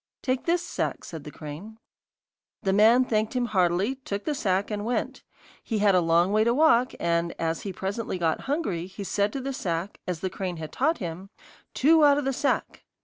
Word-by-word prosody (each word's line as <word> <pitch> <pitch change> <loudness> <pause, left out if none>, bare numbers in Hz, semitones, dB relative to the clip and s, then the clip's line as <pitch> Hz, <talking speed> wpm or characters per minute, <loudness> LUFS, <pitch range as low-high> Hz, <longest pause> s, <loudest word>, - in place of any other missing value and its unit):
'Take 255 -1 -1
this 345 +1 +1
sack,' - - -3
said 160 -4 -8
the - - -6
crane. 155 +10 -9 0.9
The 190 - +1
man 225 +5 +5
thanked 215 0 0
him 250 -1 +1
heartily, 185 +2 +1
took 205 -6 -5
the 305 - 0
sack, 200 -6 0
and 205 -1 -2
went. 240 +3 -2 0.4
He 225 - -2
had 205 -1 +4
a 180 - +4
long 170 +3 +3
way 215 +1 +3
to 235 +1 +2
walk, 260 -5 +4
and 170 0 0
as 165 0 -2
he 200 - -4
presently 195 +2 -3
got 165 -3 0
hungry, 200 - -1
he 190 +2 -8
said 200 +1 0
to 275 - -3
the 275 +1 -3
sack, 175 -3 -3
as 180 -3 -3
the 190 - -1
crane 180 -2 -4
had 155 -1 -7
taught 315 +5 +1
him: 180 +1 -6 0.5
'Two 315 +3 +5
out 285 -1 +6
of 290 - -1
the 270 - 0
sack! 275 +2 -1
205 Hz, 205 wpm, -26 LUFS, 175-255 Hz, 0.9 s, out